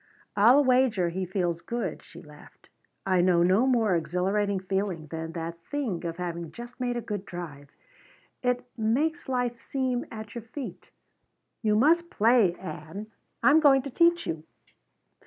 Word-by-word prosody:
"I'll 240 Hz, +8 st, +6 dB
wager 250 Hz, -9 st, +3 dB
he 185 Hz, +2 st, -3 dB
feels 175 Hz, -2 st, -1 dB
good," 235 Hz, +5 st, -4 dB
she -, -, -14 dB
laughed. -, -, -17 dB, 0.4 s
"I 185 Hz, -2 st, +3 dB
know 175 Hz, -1 st, +4 dB
no 190 Hz, +8 st, +4 dB
more 225 Hz, -7 st, +3 dB
exhilarating 190 Hz, +4 st, 0 dB
feeling 190 Hz, -3 st, -2 dB
than 160 Hz, 0 st, -5 dB
that 165 Hz, 0 st, -5 dB
thing 250 Hz, -13 st, -2 dB
of 165 Hz, 0 st, -5 dB
having 170 Hz, -2 st, -4 dB
just 240 Hz, +2 st, -10 dB
made 245 Hz, -1 st, -1 dB
a -, -, -2 dB
good 205 Hz, -3 st, -3 dB
drive. 155 Hz, -7 st, -8 dB, 0.7 s
It 250 Hz, -1 st, 0 dB
makes 270 Hz, +9 st, 0 dB
life 245 Hz, -2 st, -1 dB
seem 255 Hz, -2 st, -2 dB
at 215 Hz, -2 st, -8 dB
your 235 Hz, -, -5 dB
feet. 250 Hz, +4 st, -8 dB, 0.7 s
You 215 Hz, -2 st, +2 dB
must 335 Hz, +9 st, +4 dB
play, 225 Hz, -, +4 dB
Ann. 185 Hz, +5 st, -8 dB, 0.3 s
I'm 295 Hz, +2 st, +7 dB
going 275 Hz, -4 st, +5 dB
to 275 Hz, -, -6 dB
teach 340 Hz, +4 st, +3 dB
you." 160 Hz, -1 st, -3 dB
210 Hz, 155 wpm, -27 LUFS, 175-250 Hz, 0.7 s, I'm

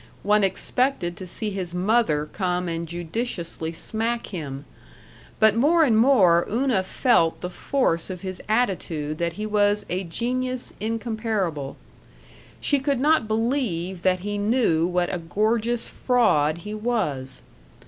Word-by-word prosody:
One 210 Hz, 0 st, +3 dB
expected 195 Hz, -1 st, 0 dB
to 185 Hz, -, -7 dB
see 210 Hz, +4 st, -4 dB
his 185 Hz, -3 st, -4 dB
mother 180 Hz, -6 st, +2 dB
come 180 Hz, +2 st, -2 dB
and 165 Hz, 0 st, -3 dB
judiciously 170 Hz, -1 st, -4 dB
smack 225 Hz, +7 st, -2 dB
him. 145 Hz, -7 st, -6 dB, 0.7 s
But 220 Hz, -1 st, +5 dB
more 315 Hz, +8 st, +4 dB
and 245 Hz, -7 st, +3 dB
more 210 Hz, -8 st, +5 dB
Una 240 Hz, -2 st, +1 dB
felt 185 Hz, -3 st, +2 dB
the 180 Hz, -, -4 dB
force 190 Hz, -9 st, 0 dB
of 180 Hz, -2 st, -6 dB
his 185 Hz, -1 st, -5 dB
attitude 170 Hz, -9 st, -1 dB
that 170 Hz, -1 st, -1 dB
he 210 Hz, +3 st, -5 dB
was 205 Hz, -1 st, +2 dB
a 185 Hz, +2 st, -1 dB
genius 250 Hz, +7 st, -2 dB
incomparable. 215 Hz, -, -2 dB, 0.8 s
She 285 Hz, -, +1 dB
could 275 Hz, -1 st, 0 dB
not 295 Hz, -4 st, +3 dB
believe 215 Hz, -6 st, -1 dB
that 185 Hz, -1 st, +2 dB
he 205 Hz, +1 st, -3 dB
knew 205 Hz, -7 st, +2 dB
what 180 Hz, 0 st, 0 dB
a 180 Hz, -, -1 dB
gorgeous 220 Hz, +7 st, 0 dB
fraud 165 Hz, -, +2 dB
he 210 Hz, -, -5 dB
was. 205 Hz, -, -2 dB
205 Hz, 140 wpm, -24 LUFS, 170-235 Hz, 0.8 s, But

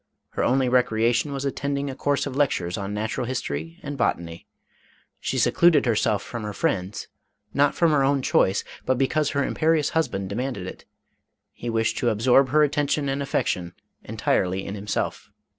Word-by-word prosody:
Her -, -, -3 dB
only 130 Hz, 0 st, +2 dB
recreation 120 Hz, +1 st, +2 dB
was 140 Hz, 0 st, -3 dB
attending 140 Hz, +1 st, -2 dB
a 135 Hz, -, -4 dB
course 140 Hz, +1 st, 0 dB
of 140 Hz, -2 st, -5 dB
lectures 95 Hz, -11 st, 0 dB
on 100 Hz, 0 st, -4 dB
natural 110 Hz, +3 st, -2 dB
history 80 Hz, -, -4 dB
and 145 Hz, -2 st, -6 dB
botany. 85 Hz, -6 st, -2 dB, 0.7 s
She -, -, -2 dB
secluded 170 Hz, -5 st, +4 dB
herself 105 Hz, -3 st, +1 dB
from 115 Hz, -, -6 dB
her 105 Hz, -1 st, -5 dB
friends, 95 Hz, 0 st, -2 dB, 0.5 s
not 145 Hz, 0 st, +3 dB
from 170 Hz, -2 st, +3 dB
her 145 Hz, -2 st, +3 dB
own 135 Hz, -1 st, +2 dB
choice, 95 Hz, -5 st, +2 dB, 0.2 s
but 130 Hz, -, +1 dB
because 145 Hz, +3 st, +1 dB
her 140 Hz, -1 st, 0 dB
imperious 155 Hz, -2 st, +1 dB
husband 120 Hz, -12 st, -1 dB
demanded 120 Hz, -3 st, -3 dB
it; 90 Hz, -, -9 dB, 0.7 s
he 120 Hz, -, -6 dB
wished 115 Hz, 0 st, 0 dB
to 120 Hz, -, +2 dB
ab 110 Hz, -, -1 dB
sorb 130 Hz, +4 st, +4 dB
her 150 Hz, +3 st, +4 dB
attention 145 Hz, 0 st, 0 dB
and 135 Hz, +1 st, -1 dB
affection 90 Hz, -10 st, -1 dB, 0.3 s
entirely 95 Hz, +1 st, 0 dB
in 100 Hz, -, -5 dB
himself. 105 Hz, 0 st, -3 dB
125 Hz, 170 wpm, -24 LUFS, 105-140 Hz, 0.7 s, secluded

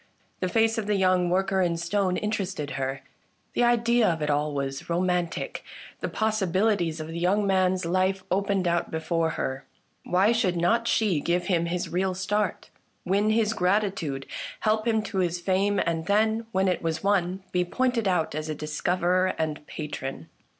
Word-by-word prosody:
The 185 Hz, -, -1 dB
face 225 Hz, +2 st, +2 dB
of 210 Hz, -, -4 dB
the 210 Hz, -, +2 dB
young 185 Hz, -2 st, +3 dB
worker 190 Hz, +1 st, +1 dB
in 170 Hz, -2 st, +1 dB
stone 180 Hz, +2 st, 0 dB
interested 195 Hz, -8 st, -3 dB
her; 135 Hz, 0 st, -3 dB, 0.5 s
the -, -, +2 dB
idea 240 Hz, -1 st, +3 dB
of 160 Hz, -2 st, -1 dB
it 150 Hz, -, +1 dB
all 150 Hz, +1 st, 0 dB
was 140 Hz, 0 st, -4 dB
romantic; 175 Hz, 0 st, -1 dB, 0.4 s
the -, -, -3 dB
possibilities 200 Hz, -5 st, +1 dB
of 155 Hz, 0 st, -6 dB
the 165 Hz, +1 st, -4 dB
young 195 Hz, +4 st, +2 dB
man's 185 Hz, -1 st, +2 dB
life 185 Hz, +2 st, +1 dB
opened 195 Hz, -1 st, +1 dB
out 170 Hz, 0 st, 0 dB
before 165 Hz, 0 st, 0 dB
her. 130 Hz, +1 st, -3 dB, 0.4 s
Why 190 Hz, +5 st, +3 dB
should 210 Hz, -7 st, +1 dB
not 230 Hz, +8 st, +2 dB
she 205 Hz, -10 st, +2 dB
give 175 Hz, +4 st, 0 dB
him 170 Hz, -3 st, +1 dB
his 175 Hz, +1 st, -2 dB
real 185 Hz, +1 st, 0 dB
start, 200 Hz, +2 st, -2 dB, 0.3 s
win 200 Hz, +3 st, +2 dB
his 220 Hz, 0 st, +2 dB
gratitude, 185 Hz, -8 st, 0 dB, 0.4 s
help 215 Hz, +1 st, +1 dB
him 220 Hz, -2 st, +2 dB
to 205 Hz, -3 st, -3 dB
his 175 Hz, -1 st, 0 dB
fame, 195 Hz, +3 st, +1 dB
and 165 Hz, -1 st, -1 dB
then, 220 Hz, +2 st, +2 dB
when 190 Hz, -2 st, +1 dB
it 180 Hz, -, 0 dB
was 165 Hz, +1 st, -2 dB
won, 190 Hz, -1 st, +1 dB
be 180 Hz, -1 st, +2 dB
pointed 240 Hz, +3 st, 0 dB
out 180 Hz, -4 st, +1 dB
as 155 Hz, +1 st, -4 dB
a 155 Hz, -, -2 dB
discoverer 180 Hz, +5 st, 0 dB
and 155 Hz, -1 st, -2 dB
a -, -, -23 dB
patron 145 Hz, -, -6 dB
185 Hz, 175 wpm, -26 LUFS, 170-205 Hz, 0.5 s, young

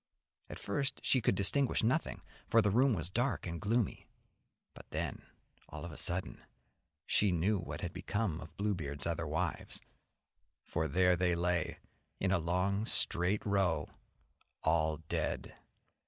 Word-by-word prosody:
At -, -, -6 dB
first 130 Hz, +7 st, -1 dB
she 130 Hz, -, +3 dB
could 100 Hz, -, +2 dB
distinguish 115 Hz, +9 st, +2 dB
nothing, 130 Hz, +8 st, 0 dB, 0.2 s
for 115 Hz, -, +5 dB
the 105 Hz, -2 st, +3 dB
room 125 Hz, +3 st, +4 dB
was 85 Hz, -3 st, -2 dB
dark 120 Hz, +5 st, 0 dB
and 85 Hz, -1 st, -4 dB
gloomy, 110 Hz, 0 st, 0 dB, 0.7 s
but -, -, -13 dB
then, -, -, -3 dB, 0.5 s
all -, -, -7 dB
of 85 Hz, -, -6 dB
a -, -, -9 dB
sudden, 90 Hz, +1 st, -2 dB, 0.6 s
she 105 Hz, -2 st, +3 dB
knew 95 Hz, +4 st, +2 dB
what 75 Hz, -4 st, -5 dB
had 90 Hz, -, -4 dB
become 100 Hz, -6 st, -2 dB
of 80 Hz, +1 st, -11 dB
Bluebeard's 80 Hz, -9 st, -2 dB
other 85 Hz, -1 st, -1 dB
wives, 80 Hz, +3 st, -2 dB, 0.8 s
for 80 Hz, 0 st, -1 dB
there 90 Hz, +4 st, +4 dB
they 90 Hz, 0 st, +2 dB
lay, 85 Hz, 0 st, 0 dB, 0.4 s
in 95 Hz, -, +1 dB
a 95 Hz, -, +3 dB
long, 90 Hz, +6 st, 0 dB
straight 90 Hz, +5 st, +2 dB
row, 100 Hz, -5 st, +1 dB, 0.7 s
all 80 Hz, -1 st, +2 dB
dead. -, -, -2 dB
90 Hz, 145 wpm, -34 LUFS, 85-105 Hz, 0.8 s, for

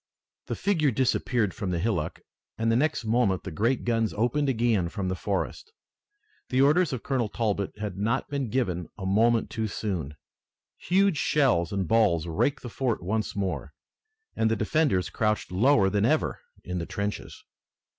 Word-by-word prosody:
The -, -, -2 dB
figure 165 Hz, -8 st, +1 dB
disappeared 120 Hz, -4 st, +1 dB
from 100 Hz, -4 st, -4 dB
the 90 Hz, -, 0 dB
hillock 85 Hz, -4 st, -2 dB, 0.4 s
and 115 Hz, 0 st, +1 dB
the -, -, +3 dB
next 145 Hz, -1 st, +1 dB
moment 110 Hz, -5 st, +1 dB
the 95 Hz, -, -6 dB
great 115 Hz, +10 st, 0 dB
guns 115 Hz, -2 st, 0 dB
opened 135 Hz, +6 st, +1 dB
again 115 Hz, -8 st, +1 dB
from 95 Hz, -1 st, -3 dB
the 95 Hz, -, -1 dB
forest. 100 Hz, -, -3 dB, 0.8 s
The 130 Hz, -, +1 dB
orders 150 Hz, +5 st, +4 dB
of 130 Hz, -4 st, -4 dB
Colonel 125 Hz, -6 st, 0 dB
Talbot 105 Hz, -4 st, -2 dB
had 105 Hz, -3 st, -5 dB
not 105 Hz, +3 st, 0 dB
been 140 Hz, -4 st, -3 dB
given 90 Hz, -9 st, -1 dB
a 95 Hz, -, -6 dB
moment 115 Hz, +4 st, +2 dB
too 110 Hz, -1 st, -2 dB
soon. 90 Hz, -9 st, -4 dB, 0.6 s
Huge 190 Hz, -1 st, +2 dB
shells 125 Hz, -, +2 dB
and 100 Hz, -3 st, -1 dB
balls 100 Hz, -7 st, +3 dB
raked 110 Hz, -, 0 dB
the -, -, -5 dB
fort 120 Hz, -5 st, -2 dB
once 110 Hz, +4 st, -2 dB
more 80 Hz, -8 st, -3 dB, 0.6 s
and 110 Hz, -, +2 dB
the 110 Hz, -, +2 dB
defenders 110 Hz, -, +1 dB
crouched 105 Hz, -3 st, -1 dB
lower 110 Hz, +2 st, +4 dB
than 100 Hz, +1 st, +1 dB
ever 155 Hz, +4 st, +1 dB, 0.2 s
in 90 Hz, 0 st, -3 dB
the 85 Hz, -, -4 dB
trenches. 100 Hz, 0 st, -5 dB
110 Hz, 165 wpm, -27 LUFS, 95-125 Hz, 0.8 s, orders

